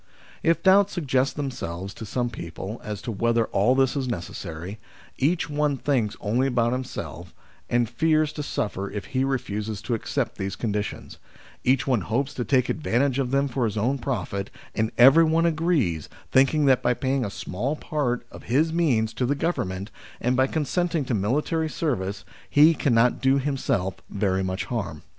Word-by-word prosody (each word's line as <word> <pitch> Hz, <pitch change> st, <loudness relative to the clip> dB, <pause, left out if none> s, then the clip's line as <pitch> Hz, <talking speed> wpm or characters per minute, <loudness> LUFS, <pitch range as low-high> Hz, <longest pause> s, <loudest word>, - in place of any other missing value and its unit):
If 165 Hz, 0 st, +2 dB
doubts 200 Hz, +1 st, +5 dB
suggest 135 Hz, -5 st, 0 dB
themselves 100 Hz, -, -4 dB
to 110 Hz, -, -8 dB
some 120 Hz, +3 st, -1 dB
people 95 Hz, +5 st, -7 dB
as 105 Hz, -1 st, -5 dB
to 120 Hz, -, -3 dB
whether 115 Hz, +2 st, +1 dB
all 110 Hz, +7 st, +2 dB
this 135 Hz, 0 st, +2 dB
is 135 Hz, -2 st, -1 dB
necessary, 90 Hz, -2 st, -5 dB, 0.4 s
each 150 Hz, +2 st, +1 dB
one 150 Hz, -1 st, 0 dB
thinks 125 Hz, -6 st, 0 dB
only 120 Hz, +6 st, +1 dB
about 120 Hz, -2 st, +1 dB
himself, 130 Hz, 0 st, -6 dB, 0.3 s
and 120 Hz, -1 st, +2 dB
fears 155 Hz, +2 st, +1 dB
to 150 Hz, -, -4 dB
suffer 100 Hz, -7 st, -3 dB
if 105 Hz, -, -5 dB
he 130 Hz, 0 st, +2 dB
refuses 110 Hz, -6 st, -2 dB
to 120 Hz, -, -2 dB
accept 115 Hz, -, -2 dB
these 95 Hz, 0 st, -3 dB
conditions; 105 Hz, -2 st, -4 dB, 0.4 s
each 130 Hz, 0 st, +2 dB
one 125 Hz, -6 st, +2 dB
hopes 125 Hz, +10 st, -1 dB
to 125 Hz, -, -2 dB
take 125 Hz, +2 st, +2 dB
advantage 140 Hz, -2 st, +1 dB
of 130 Hz, -2 st, 0 dB
them 140 Hz, +2 st, +2 dB
for 130 Hz, -1 st, -2 dB
his 110 Hz, -1 st, -2 dB
own 130 Hz, +6 st, +1 dB
profit, 100 Hz, -6 st, -3 dB, 0.2 s
and 110 Hz, 0 st, 0 dB
everyone 160 Hz, +6 st, +6 dB
agrees, 155 Hz, -, +1 dB, 0.2 s
thinking 135 Hz, +4 st, +4 dB
that 130 Hz, -2 st, +4 dB
by 120 Hz, 0 st, +2 dB
paying 135 Hz, +1 st, 0 dB
a 105 Hz, -, -2 dB
small 120 Hz, +10 st, -3 dB
part 145 Hz, -6 st, -2 dB
of -, -, -11 dB
his 155 Hz, +7 st, +2 dB
means 125 Hz, -10 st, +2 dB
to 125 Hz, -, -1 dB
the 140 Hz, -, +1 dB
Govern 145 Hz, -, -1 dB
ment, 95 Hz, +3 st, -6 dB, 0.3 s
and 125 Hz, +2 st, +1 dB
by 130 Hz, +1 st, +3 dB
consenting 160 Hz, +1 st, 0 dB
to 125 Hz, -, -2 dB
military 150 Hz, -, 0 dB
service, 105 Hz, -, -2 dB, 0.2 s
he 155 Hz, +3 st, +6 dB
cannot 125 Hz, -5 st, +2 dB
do 135 Hz, 0 st, +4 dB
himself 130 Hz, -9 st, -1 dB
very 95 Hz, -2 st, 0 dB
much 95 Hz, +3 st, -2 dB
harm. 105 Hz, -10 st, -4 dB
125 Hz, 175 wpm, -25 LUFS, 105-145 Hz, 0.4 s, everyone